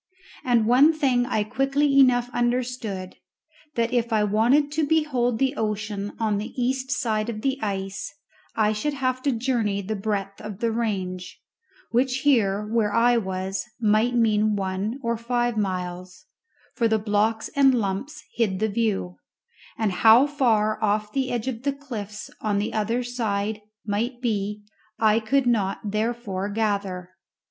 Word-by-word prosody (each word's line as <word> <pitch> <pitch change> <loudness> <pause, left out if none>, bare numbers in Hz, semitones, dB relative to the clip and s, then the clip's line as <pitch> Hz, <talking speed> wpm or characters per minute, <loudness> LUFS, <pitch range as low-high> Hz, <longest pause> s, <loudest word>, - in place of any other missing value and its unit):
And 240 -3 +3
one 265 +7 +6
thing 255 -5 +1
I 215 -4 +1
quickly 275 +4 +2
enough 245 -2 +5
understood: 240 -6 -2 0.6
that 235 +1 0
if 235 -1 +1
I 215 -1 +3
wanted 240 +8 +3
to 310 +1 0
behold 280 -7 +1
the 270 +3 +1
ocean 210 -3 -3
on 215 -3 +1
the 215 +4 -6
east 260 +1 -1
side 225 -4 0
of 215 -2 -5
the 270 +2 -1
ice 195 -1 -3 0.4
I 215 -1 +2
should 285 +8 -2
have 255 -1 -1
to 280 - +1
journey 230 -4 0
the 205 +2 -3
breadth 200 -1 -3
of 210 -2 -7
the 230 +2 0
range, 190 -6 -3 0.5
which 255 +2 +1
here, 210 -8 +2
where 215 -1 0
I 240 +2 +4
was, 190 -2 -2 0.2
might 220 +2 +2
mean 215 -2 +3
one 195 +5 -2
or 235 0 0
five 240 0 -1
miles, 185 -2 -4 0.5
for 230 - +1
the 220 0 +2
blocks 215 +1 0
and 270 -2 +5
lumps 230 +8 -3
hid 210 -5 0
the 220 +3 0
view, 200 - -1 0.6
and 220 -3 0
how 225 +7 +6
far 225 -8 +1
off 210 0 0
the 265 -2 0
edge 240 0 -2
of 235 -3 -3
the 280 +1 0
cliffs 220 -8 -7
on 210 -2 0
the 205 +2 -2
other 225 +3 0
side 215 -3 -2 0.2
might 230 +4 -2
be 210 -3 -2 0.3
I 220 0 +4
could 265 +4 +1
not 205 -3 0
therefore 215 -3 -2
gather. 200 -4 -2
220 Hz, 155 wpm, -24 LUFS, 205-245 Hz, 0.6 s, one